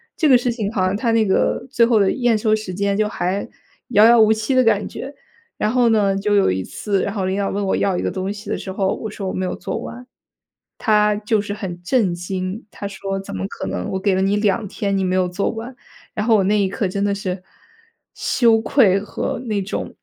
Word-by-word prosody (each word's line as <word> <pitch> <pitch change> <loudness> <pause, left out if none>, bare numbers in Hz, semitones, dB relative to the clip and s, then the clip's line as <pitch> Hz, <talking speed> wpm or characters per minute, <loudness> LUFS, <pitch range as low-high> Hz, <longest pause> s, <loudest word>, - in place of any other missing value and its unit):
这 310 -3 +2
个 255 - +8
事 245 0 -1
情 215 -3 -3
好 185 -4 0
像 185 +2 0
他 230 +2 0
那 225 -1 +3
个 200 +5 +1
最 235 -3 +3
后 230 -2 +3
的 195 - +3
验 240 -4 +2
收 215 0 +2
时 215 -4 -6
间， 200 +1 0
就 210 0 +1
还 185 +1 -2 0.4
遥 215 -2 +6
遥 235 -1 +7
无 220 0 +5
期 220 +4 0
的 255 - +5
感 210 -3 +2
觉。 275 - -7 0.5
然 215 - 0
后 245 -2 +3
呢， 200 -3 +2
就 205 +1 +1
有 195 - +4
一 95 0 -2
次， 200 - -2
然 200 - -2
后 195 -3 -2
领 190 +1 -1
导 200 - 0
问 200 +1 -2
我 190 - +1
要 190 -2 +1
一 - - -1
个 - - -1
东 190 +1 -3
西 205 0 -10
的 - - -1
时 190 - -6
候， 190 0 0
我 220 - -6
说 200 -2 -5
我 - - -3
没 185 - -2
有 - - -3
做 - - -4
完， 250 +1 -8 0.7
他 210 -1 +3
就 210 0 0
是 205 0 -4
很 180 -4 -6
震 200 -3 +2
惊， 185 +4 -4
他 200 - -6
说 195 0 -4
怎 195 - -8
么 95 +1 -3
可 - - -6
能 90 -1 -3
我 190 - -2
给 195 -1 +2
了 190 - +1
你 195 +1 +2
2 210 0 +1
天 200 0 -2
你 190 - 0
没 185 0 0
有 185 -1 +2
做 180 +3 -1
完？ 235 +3 -7 0.4
然 210 +1 -2
后 225 - +5
我 200 - +3
那 210 +2 +2
一 195 - +2
刻 195 0 -2
真 200 +2 -2
的 200 0 +1
是 185 -2 -4 0.7
羞 230 -3 +3
愧 220 -5 +4
和 205 +1 -4
那 205 -3 -1
种 190 - -5
205 Hz, 265 characters per minute, -20 LUFS, 190-220 Hz, 0.7 s, 个